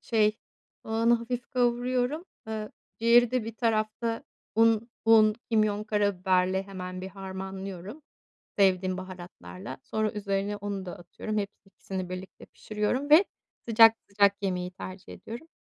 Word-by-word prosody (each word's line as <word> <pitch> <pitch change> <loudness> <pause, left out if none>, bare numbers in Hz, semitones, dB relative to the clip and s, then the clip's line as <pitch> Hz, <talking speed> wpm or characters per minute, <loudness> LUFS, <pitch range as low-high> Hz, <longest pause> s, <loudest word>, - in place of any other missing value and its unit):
şey, 215 -2 +2 0.5
soğanı 230 +2 +3
hafif 235 +1 -3
kavuruyorum. 250 +5 +1 0.2
Eee, 215 -1 -4 0.3
ciğeri 235 +1 +5
de 255 -3 0
bir 225 0 -6
tarafta, 225 0 0 0.3
un, 225 +1 +4 0.2
un, 220 -1 +6 0.2
kimyon, 215 -2 +2
karabiberle, 190 -3 +1
hemen, 185 -2 -7
bir 190 - -5
harmanlıyorum 190 - -7 0.6
sevdiğim 185 -2 +3
baharatlarla. 185 +1 -9
Sonra 215 0 -1
üzerine, 200 0 -2
onu 200 -2 -4
da 175 - -7
atıyorum, 215 +5 -5
hepsi 205 -1 -3
ikisini 190 -1 -6
birlikte 185 +1 -8
pişiriyorum 215 +7 -2
ve 320 +7 +8 0.4
sıcak, 225 0 +8
sıcak, 200 0 +3
yemeyi 180 -2 -1
tercih 185 0 -9
ediyorum. 235 +8 -9
210 Hz, 125 wpm, -28 LUFS, 190-230 Hz, 0.6 s, ve